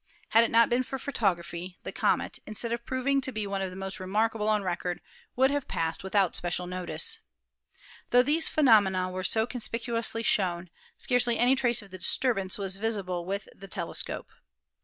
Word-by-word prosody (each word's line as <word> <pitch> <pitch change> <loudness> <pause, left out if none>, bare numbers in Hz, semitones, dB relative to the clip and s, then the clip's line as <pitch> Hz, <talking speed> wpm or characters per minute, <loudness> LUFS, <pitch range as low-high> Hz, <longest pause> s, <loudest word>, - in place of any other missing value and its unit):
Had 230 - +6
it 230 - +1
not 230 0 +5
been 240 +1 +2
for 270 +1 -4
photography, 180 -8 -2
the - - -5
comet, - - 0
instead 230 +2 -2
of 235 0 -4
proving 275 +2 +1
to 265 - 0
be 215 -3 -3
one 195 -1 -2
of 190 - -2
the 185 - -10
most 190 +1 -4
remarkable 215 +3 0
on 210 -1 +2
record, 180 -1 -2 0.4
would 265 +2 +4
have 285 -1 -2
passed 165 +1 -2
without 190 -1 +1
special 175 0 -2
notice. 180 0 -2 0.9
The* 245 0 +6
these 310 +4 +3
phenomena 200 -10 +4
were 185 0 -4
so 220 +3 +2
conspicuously 230 -1 -2
shown, 180 -5 0 0.3
scarcely 245 -2 +2
any 245 +2 +4
trace 240 -4 +2
of 200 - -16
the 185 - -8
disturbance 195 -2 +1
was 195 -2 -1
visible 195 -5 -2
with 195 +2 -3
the 195 - -11
tele - - -5
scope. - - -3
210 Hz, 180 wpm, -28 LUFS, 185-240 Hz, 0.9 s, Had